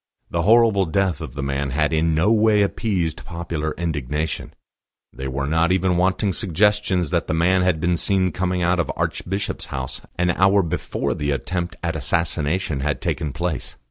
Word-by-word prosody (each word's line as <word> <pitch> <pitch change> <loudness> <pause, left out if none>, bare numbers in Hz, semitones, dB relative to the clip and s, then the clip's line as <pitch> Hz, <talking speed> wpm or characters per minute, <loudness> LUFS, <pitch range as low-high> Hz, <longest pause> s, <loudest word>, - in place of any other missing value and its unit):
The 85 - 0
horrible 110 -1 +4
death 95 +1 0
of - - -7
the 70 - -3
man 70 0 -1
had 75 +4 0
in 80 0 +2
no 90 +7 +3
way 110 -2 +4
appeased 90 -6 -1
popular 80 -2 -4
indignation; 75 -2 -3 0.6
there 65 +1 -5
were 70 +1 -2
not 80 +3 +2
even 95 -1 +2
wanting 95 +2 +1
suggestions 100 -2 +1
that - - 0
the - - 0
man 90 +3 +3
had 90 -3 +2
been 85 +1 +1
seen 95 0 +1
coming 90 -1 -1
out 90 +1 +2
of 85 - 0
Archbishop's 95 +3 -2
House 65 -1 -5 0.2
an 90 0 +2
hour 95 +3 +4
before 85 0 -2
the 75 - -3
attempt 85 +5 -2
at 85 -1 -1
assassination 80 +1 -1
had 75 +2 -1
taken 75 - -2
place. 80 -1 -3
85 Hz, 175 wpm, -22 LUFS, 75-95 Hz, 0.6 s, horrible